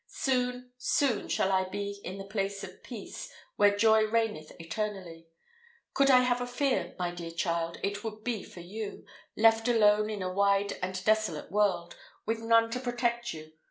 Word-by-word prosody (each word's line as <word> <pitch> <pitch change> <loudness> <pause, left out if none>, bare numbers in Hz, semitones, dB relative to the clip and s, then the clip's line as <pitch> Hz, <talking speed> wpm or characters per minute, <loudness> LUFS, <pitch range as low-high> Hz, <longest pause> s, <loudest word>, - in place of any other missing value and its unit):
Soon, 250 -1 -1
soon 250 -2 +1
shall 190 - +1
I 190 0 +3
be 200 +1 -4
in 190 - -6
the 195 - -6
place 200 0 -3
of 185 -1 -10
peace, 225 -6 -8 0.2
where 205 0 +4
joy 220 0 +5
reigneth 215 -8 -1
eternally. 170 -2 -5 0.7
Could 275 0 +4
I 255 -1 +7
have 250 0 +1
a 245 - -2
fear, 245 -8 -1
my 180 -1 -1
dear 175 -1 -7
child, 170 0 -2
it 205 +1 -2
would 215 -1 -6
be 230 -4 -2
for 175 - -11
you, 205 +4 -7 0.3
left 225 +1 +5
alone 215 -2 +4
in 205 -3 -3
a 185 0 -3
wide 200 +1 +2
and 185 0 -3
desolate 215 -9 +1
world, 195 -4 +1 0.3
with 225 +1 -1
none 230 0 +3
to 250 - -2
protect 240 -1 -1
you. 155 0 -9
210 Hz, 175 wpm, -30 LUFS, 185-230 Hz, 0.7 s, I